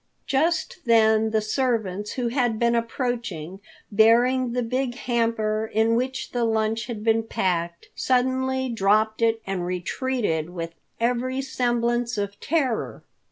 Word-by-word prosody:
Just 325 +7 0
then 220 -1 +4
the 220 0 +1
servants 215 -4 -1
who 245 -2 -1
had 240 -3 0
been 235 +1 +2
approaching, 230 - -3 0.3
bearing 235 +4 +4
the 250 0 0
big 250 +1 -1
hamper 220 -3 0
in 220 +1 +2
which 255 +3 -2
the 245 -1 -1
lunch 220 0 0
had 225 -4 -5
been 225 0 +3
packed, 170 -6 -2
suddenly 260 +1 +1
dropped 215 0 +2
it 225 -1 +2
and 195 -2 -2
retreated 180 - -2
with 170 -2 -6 0.3
every 250 +2 0
semblance 240 -2 0
of 200 0 -3
terror. 275 -7 -1
230 Hz, 130 wpm, -24 LUFS, 215-250 Hz, 0.3 s, then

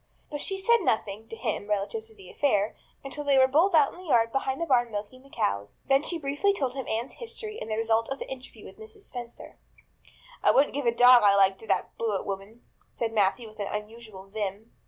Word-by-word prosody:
But 290 -1 -4
she 390 - -2
said 470 +5 +4
nothing, 220 - -1
to 225 - -7
him, 220 -3 -3
relative 210 +2 -2
to 220 0 -14
the 190 -3 -13
affair, 210 -7 +1 0.3
until 275 +2 -6
they 280 -1 +3
were 260 - +7
both 330 +7 +3
out 295 -3 +4
in - - -13
the 370 - -11
yard 230 -5 +3
behind 270 0 -1
the 335 - -1
barn 245 -5 +3
milking 210 +4 -6
the 275 - -19
cows. 100 - -3
Then 270 0 +5
she 340 +3 -2
briefly 295 +7 +1
told 270 -9 -2
him 265 -2 -5
Anne's 230 +4 -2
history 460 -2 -6
and - - -6
the 215 - -1
result 225 0 +1
of 270 - -3
the - - -7
interview 265 0 -9
with - - -13
Mrs. 440 -1 -11
Spencer. 240 -8 -9 0.8
"I - - +4
wouldn't 280 +2 +4
give 280 -2 -2
a - - +5
dog 245 +1 +7
I 200 -1 +5
liked 195 -1 +4
to 225 - -13
that - - -1
Blewett 215 -4 -1
woman," 200 +4 -6 0.3
said 230 -1 -3
Matthew 215 +3 +1
with 215 0 -16
unusual 210 0 -6
vim. 205 +1 -5
235 Hz, 225 wpm, -27 LUFS, 210-280 Hz, 0.8 s, were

